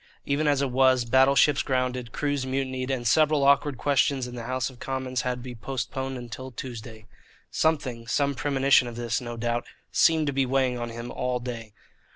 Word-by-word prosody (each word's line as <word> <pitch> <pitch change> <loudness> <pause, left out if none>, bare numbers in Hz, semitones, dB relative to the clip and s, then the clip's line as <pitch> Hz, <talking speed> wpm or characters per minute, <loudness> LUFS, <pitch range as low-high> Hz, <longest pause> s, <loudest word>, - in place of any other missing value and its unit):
Even 145 +2 0
as 140 -1 +2
it 135 - -1
was, 130 -1 +4
battleships 135 +3 +4
grounded, 125 -2 -2
crews 145 -1 -1
mutinied, 130 -1 -2
and 130 -3 -2
several 155 +2 +3
awkward 140 -1 +3
questions 140 -1 +1
in 125 - -8
the 120 -2 -6
House 130 0 -1
of 130 -3 -11
Commons 130 -1 -3
had 125 0 -1
to - - -9
be 125 -1 -7
postponed 130 +1 -5
till 130 +3 -7
Tuesday. 115 -3 -8 0.5
Something 130 -7 0
some 140 +3 +1
premonition 135 -1 +3
of 120 - -7
this, 120 0 -2
no 120 -1 -6
doubt 120 +1 -2 0.2
seemed 160 -1 +4
to 140 - -1
be 135 0 +2
weighing 130 -1 +1
on 120 0 -4
him 115 +1 -7
all 125 0 -2
day. 115 -3 -7
130 Hz, 190 wpm, -26 LUFS, 120-135 Hz, 0.5 s, was